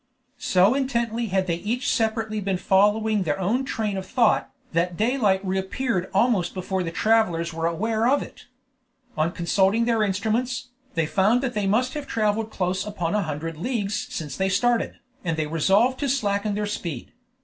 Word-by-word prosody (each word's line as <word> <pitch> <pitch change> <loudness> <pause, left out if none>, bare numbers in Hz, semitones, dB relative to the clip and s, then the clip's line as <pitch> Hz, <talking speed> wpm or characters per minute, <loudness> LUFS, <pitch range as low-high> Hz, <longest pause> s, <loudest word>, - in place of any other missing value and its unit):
So 185 +5 +4
intently 235 -4 -1
had 190 -1 +1
they 170 -2 -1
each 230 +8 -2
separately 220 -1 0
been 195 -1 -1
following 210 +3 +3
their 160 -1 -1
own 220 +8 +1
train 215 -6 -2
of 190 0 -5
thought, 230 -1 +2 0.2
that 170 +1 0
daylight 215 -5 +2
reappeared 190 +2 -1
almost 200 -3 +2
before 190 0 -2
the 170 - -2
travelers 175 -4 +1
were 165 0 -1
aware 220 +7 0
of 280 +3 +3
it. - - -14 0.7
On 155 +2 +1
consulting 190 +6 +2
their 230 -2 +2
instruments, 225 +5 -1 0.3
they 165 -1 +2
found 205 +9 +2
that 255 -2 -1
they 210 -3 -1
must 245 +6 +1
have 295 -2 -5
traveled 215 0 0
close 185 -2 -1
upon 185 -5 -3
a 210 - +2
hundred 160 -1 -4
leagues 210 +1 -2
since 150 -4 -5
they 190 0 0
started, 240 +4 +1 0.3
and 165 -3 -1
they 155 - 0
resolved 195 - +2
to 285 - -1
slacken 205 -5 0
their 210 0 -1
speed. 170 - -5
205 Hz, 170 wpm, -24 LUFS, 180-230 Hz, 0.7 s, So